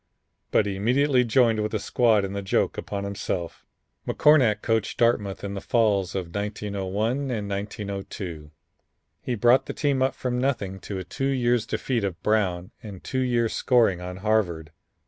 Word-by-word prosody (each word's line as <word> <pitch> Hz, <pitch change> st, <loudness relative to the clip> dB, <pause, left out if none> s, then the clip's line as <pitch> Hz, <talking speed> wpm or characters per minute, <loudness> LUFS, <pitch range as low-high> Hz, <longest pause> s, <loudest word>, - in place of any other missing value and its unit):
But 110 Hz, -, +3 dB
immediately 125 Hz, +7 st, +2 dB
joined 115 Hz, -1 st, +3 dB
with 105 Hz, +1 st, -2 dB
the 110 Hz, -, 0 dB
squad 110 Hz, -1 st, +2 dB
in 95 Hz, -, -5 dB
the 100 Hz, -, -3 dB
joke 95 Hz, -, 0 dB
upon 100 Hz, -1 st, -4 dB
himself." 100 Hz, -3 st, -4 dB, 0.4 s
McCornack 135 Hz, -8 st, +4 dB
coached 110 Hz, -2 st, 0 dB
Dartmouth 105 Hz, -5 st, +1 dB
in 100 Hz, -1 st, -4 dB
the 100 Hz, -, -5 dB
falls 100 Hz, -6 st, +1 dB
of 90 Hz, -3 st, -4 dB
1901 105 Hz, +5 st, -2 dB
and 110 Hz, -5 st, -2 dB
1902. 100 Hz, -5 st, -5 dB, 0.7 s
He 125 Hz, -, -2 dB
brought 120 Hz, +4 st, +4 dB
the -, -, -4 dB
team 140 Hz, -3 st, 0 dB
up 130 Hz, -, +1 dB
from 125 Hz, -1 st, -2 dB
nothing 105 Hz, -8 st, -1 dB
to 100 Hz, +1 st, -6 dB
a 95 Hz, -, -4 dB
two 135 Hz, +9 st, -3 dB
years' 120 Hz, -4 st, +1 dB
defeat 120 Hz, -5 st, -1 dB
of 90 Hz, -3 st, -3 dB
Brown 95 Hz, -5 st, 0 dB
and 100 Hz, -5 st, -10 dB
two 130 Hz, -, -2 dB
years' 120 Hz, -3 st, +1 dB
scoring 115 Hz, -8 st, +2 dB
on 90 Hz, +1 st, -6 dB
Harvard. 85 Hz, -8 st, 0 dB
105 Hz, 165 wpm, -25 LUFS, 95-120 Hz, 0.7 s, McCornack